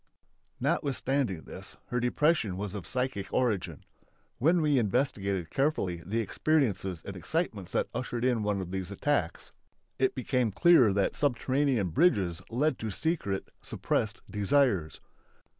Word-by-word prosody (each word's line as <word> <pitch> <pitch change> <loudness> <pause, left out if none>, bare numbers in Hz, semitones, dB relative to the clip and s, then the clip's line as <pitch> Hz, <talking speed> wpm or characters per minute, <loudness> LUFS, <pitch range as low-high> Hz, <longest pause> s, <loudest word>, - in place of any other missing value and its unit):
Notwithstanding 135 - 0
this, - - -10
her 125 - 0
depression 125 - +1
was 100 0 -4
of 100 -5 -6
psychic 125 -7 -2
origin. 100 - -1 0.6
When 165 +8 +4
we 150 -4 +3
investigated 100 - -1
carefully 115 - 0
the 110 +5 -1
experiences 100 - 0
and 100 - -6
excitements 105 - -3
that - - +1
ushered 120 -1 -3
in 125 -3 +2
one 105 -2 0
of 90 -1 -6
these 95 -1 -3
attacks 100 - -1 0.5
it 130 0 +2
became 125 -3 0
clear 125 - +5
that 100 0 +1
subterranean 130 -5 +1
bridges 90 - +2
led 135 +4 0
to 110 - -3
secret 105 - -2
(suppressed) 110 0 -2
desires. 105 - +1
115 Hz, 130 wpm, -29 LUFS, 95-135 Hz, 0.6 s, clear